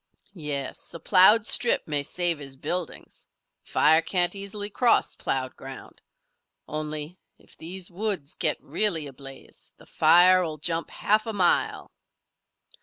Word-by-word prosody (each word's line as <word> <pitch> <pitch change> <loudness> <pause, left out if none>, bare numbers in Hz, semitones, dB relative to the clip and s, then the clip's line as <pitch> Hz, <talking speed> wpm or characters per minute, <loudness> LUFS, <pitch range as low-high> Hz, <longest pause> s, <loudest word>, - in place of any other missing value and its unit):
"Yes. 150 -4 -4
A - - -7
ploughed 200 +6 +5
strip 240 0 +1
may 145 -2 0
save 170 +2 +1
his 135 -2 -8
buildings. 175 +5 -6 0.4
Fire 160 +2 +3
can't 175 +1 +1
easily 200 +1 -5
cross 235 +3 +1
ploughed 130 -1 -4
ground. 135 0 -12 0.7
Only, 155 +2 -5 0.2
if - - -19
these 180 +2 -7
woods 190 -6 -2
get 155 -3 +1
really 165 0 0
ablaze, 135 0 -12
the - - -18
fire 185 +1 +5
will 155 -3 -5
jump 165 +2 -3
half 215 +2 0
a 225 - -3
mile!" 185 -4 0
170 Hz, 130 wpm, -25 LUFS, 150-190 Hz, 0.7 s, ploughed